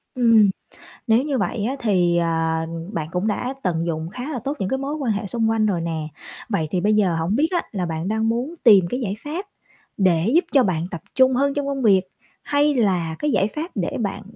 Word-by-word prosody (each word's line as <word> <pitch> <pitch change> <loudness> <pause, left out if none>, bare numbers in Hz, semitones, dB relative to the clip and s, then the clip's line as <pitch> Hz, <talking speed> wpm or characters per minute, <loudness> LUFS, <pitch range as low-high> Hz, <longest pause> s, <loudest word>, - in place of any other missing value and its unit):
Ừm, 230 -5 +5 0.6
nếu 225 +4 +4
như 285 -3 -1
vậy 210 -3 -1
á 260 - -1
thì, 180 -6 +2
à, 165 -1 0 0.3
bạn 155 -2 -3
cũng 180 +4 -1
đã 245 +5 -2
tận 170 -3 0
dụng 160 -1 -3
khá 250 +7 -6
là 260 - -3
tốt 275 +6 -4
những 190 - -2
cái 265 - 0
mối 280 +3 -3
quan 265 -7 -1
hệ 205 0 -2
xung 225 +1 0
quanh 225 -1 +2
rồi 190 -5 0
nè. 160 -2 -3 0.4
Vậy 170 -8 0
thì 180 - 0
bây 210 +3 +2
giờ 190 -5 +2
hổng 165 +5 0
biết 300 +6 +3
á 345 - +2
là 190 -4 -2
bạn 165 +1 -3
đang 220 +2 0
muốn 245 +7 -2
tìm 205 -7 +7
cái 250 - -2
giải 205 -6 -2
pháp 330 +7 -4 0.5
để 180 -1 +2
giúp 345 - +5
cho 275 -3 +5
bạn 170 -5 0
tập 170 - -6
trung 260 0 +5
hơn 275 +2 +1
trong 285 -1 -2
công 275 -1 -2
việc, 195 -4 +5 0.4
hay 290 0 +2
là 180 -8 +1
cái 295 - 0
giải 195 - +2
pháp 325 +4 -4
để 185 -4 -2
bạn, 205 -2 -3
215 Hz, 235 wpm, -22 LUFS, 175-260 Hz, 0.6 s, tìm